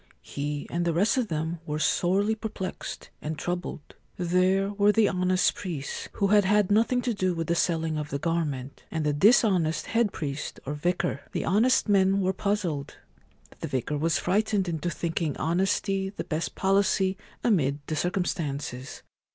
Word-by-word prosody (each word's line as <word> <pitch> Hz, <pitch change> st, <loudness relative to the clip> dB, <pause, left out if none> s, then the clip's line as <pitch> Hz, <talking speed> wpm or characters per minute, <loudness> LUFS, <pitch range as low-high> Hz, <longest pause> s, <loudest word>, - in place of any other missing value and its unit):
He 145 Hz, 0 st, -4 dB
and 170 Hz, 0 st, 0 dB
the 170 Hz, -2 st, 0 dB
rest 200 Hz, +6 st, +3 dB
of 250 Hz, -3 st, +1 dB
them 160 Hz, 0 st, -2 dB
were 150 Hz, 0 st, -2 dB
sorely 185 Hz, +7 st, +2 dB
perplexed 215 Hz, -4 st, -6 dB
and 155 Hz, +1 st, -4 dB
troubled. 175 Hz, -3 st, -4 dB, 0.2 s
There 185 Hz, +3 st, +2 dB
were 205 Hz, 0 st, +4 dB
the 215 Hz, 0 st, +4 dB
honest 185 Hz, 0 st, +2 dB
priests, 160 Hz, -8 st, -5 dB
who 200 Hz, -, +1 dB
had 205 Hz, 0 st, +5 dB
had 205 Hz, 0 st, +3 dB
nothing 230 Hz, +4 st, +3 dB
to 245 Hz, -, 0 dB
do 185 Hz, -3 st, 0 dB
with 165 Hz, 0 st, -2 dB
the 170 Hz, -, +1 dB
selling 165 Hz, -2 st, 0 dB
of 150 Hz, -1 st, -5 dB
the 140 Hz, -, -2 dB
garment, 145 Hz, -4 st, -2 dB
and 160 Hz, -2 st, -2 dB
the 150 Hz, -, +2 dB
dishonest 180 Hz, -3 st, +3 dB
head 225 Hz, -3 st, +1 dB
priest 145 Hz, -2 st, -5 dB
or 140 Hz, -, -3 dB
vicar. 160 Hz, -1 st, -1 dB
The -, -, -1 dB
honest 225 Hz, +9 st, +3 dB
men 195 Hz, -1 st, +4 dB
were 190 Hz, 0 st, +1 dB
puzzled. 185 Hz, -8 st, -2 dB, 0.6 s
The -, -, -4 dB
vicar 130 Hz, +3 st, -2 dB
was 165 Hz, +2 st, +2 dB
frightened 200 Hz, 0 st, +1 dB
into 170 Hz, 0 st, -2 dB
thinking 165 Hz, -2 st, -2 dB
honesty 190 Hz, +3 st, 0 dB
the 200 Hz, -, -6 dB
best 155 Hz, +1 st, -3 dB
policy 195 Hz, 0 st, +2 dB, 0.3 s
amid 150 Hz, -, +2 dB
the 155 Hz, -, -3 dB
circumstances. 150 Hz, -7 st, -3 dB
175 Hz, 165 wpm, -27 LUFS, 155-200 Hz, 0.6 s, had